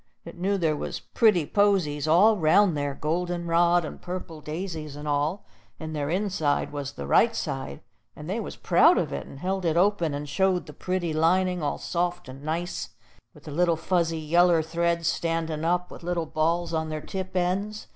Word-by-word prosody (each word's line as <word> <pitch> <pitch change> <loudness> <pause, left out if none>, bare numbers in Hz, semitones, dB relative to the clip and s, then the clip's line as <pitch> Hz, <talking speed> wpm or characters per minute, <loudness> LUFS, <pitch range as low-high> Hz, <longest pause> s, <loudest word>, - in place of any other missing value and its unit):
It 170 - -9
knew 195 +3 0
there 160 -4 +1
was - - -4
pretty 210 -9 +2
posies 175 -7 +1
all 195 +8 +6
'round 175 +1 +4
there, 145 -1 -2
golden 175 +3 -2
rod 170 0 +3
and - - -8
purple 175 -3 -6
daisies 155 -1 -5
and 150 +1 -7
all; 150 +6 -1 0.3
and 155 -1 -6
their 145 -1 -2
inside 180 -5 0
was 145 -1 -4
the - - -7
right 230 0 +4
side, 135 -9 -4 0.3
and 150 - -9
they 200 +6 -2
was 215 - -6
proud - - +4
of - - -1
it, 70 - -5
and - - -11
held 190 +5 -2
it 165 -1 +1
open, 175 -5 +2
and 145 +1 -5
showed 185 +4 +1
the - - -11
pretty 180 -3 -2
lining, 180 +3 +2
all 145 - -1
soft 175 0 -2
and 130 +1 -10
nice 165 +4 -3 0.5
with - - -16
the 150 - -8
little 170 +2 +2
fuzzy 165 -1 0
yeller 165 +1 +3
threads 170 +1 0
standin' 165 -2 -1
up, 180 +2 0
with - - -10
little 175 -1 -2
balls 165 +2 0
on 160 -1 -1
their 155 -1 -4
tip 185 +3 -6
ends. 195 +4 -1
170 Hz, 190 wpm, -26 LUFS, 155-180 Hz, 0.5 s, all